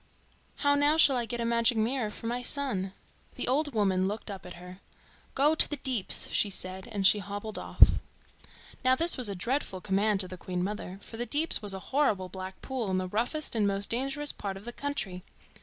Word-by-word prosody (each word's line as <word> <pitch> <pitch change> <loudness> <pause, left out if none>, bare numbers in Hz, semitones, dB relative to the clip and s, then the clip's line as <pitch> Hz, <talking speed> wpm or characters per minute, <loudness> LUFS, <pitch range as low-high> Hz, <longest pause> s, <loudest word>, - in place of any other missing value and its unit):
How 285 -1 +2
now 290 +2 +3
shall 285 -4 +6
I 240 -2 -1
get 240 +2 -4
a - - -1
magic 235 0 +3
mirror 225 +1 0
for 210 - -10
my 240 +2 -1
son?" 245 -8 0 0.4
The - - -1
old 290 0 +1
woman 190 -3 +2
looked 210 +1 -4
up 195 -2 -8
at 180 - -9
her. 180 +2 -11 0.6
"Go 290 +3 +4
to 315 - +5
the 295 - -3
Deeps," 250 -8 0
she 205 - +2
said, 185 0 -3
and 200 -3 -2
she 205 +2 +6
hobbled 205 +2 -5
off. - - +5 1.0
Now 255 0 +5
this 335 +5 +2
was 250 -5 +3
a 200 - -3
dreadful 235 0 -2
command 200 +2 +1
to 185 - -2
the 185 0 -8
Queen 180 0 -3
mother, 195 -1 -4
for 225 - -9
the 240 +1 -3
Deeps 305 -2 +1
was 205 -2 +1
a - - -5
horrible 210 -11 +2
black 190 0 -8
pool 255 -6 -3
in 185 - +1
the 185 0 -2
roughest 245 - -2
and 215 -3 +2
most 200 0 +1
dangerous 275 +4 -1
part 195 -1 -5
of 195 - -12
the 240 - -6
country. 205 -12 -3
215 Hz, 215 wpm, -29 LUFS, 190-265 Hz, 1.0 s, shall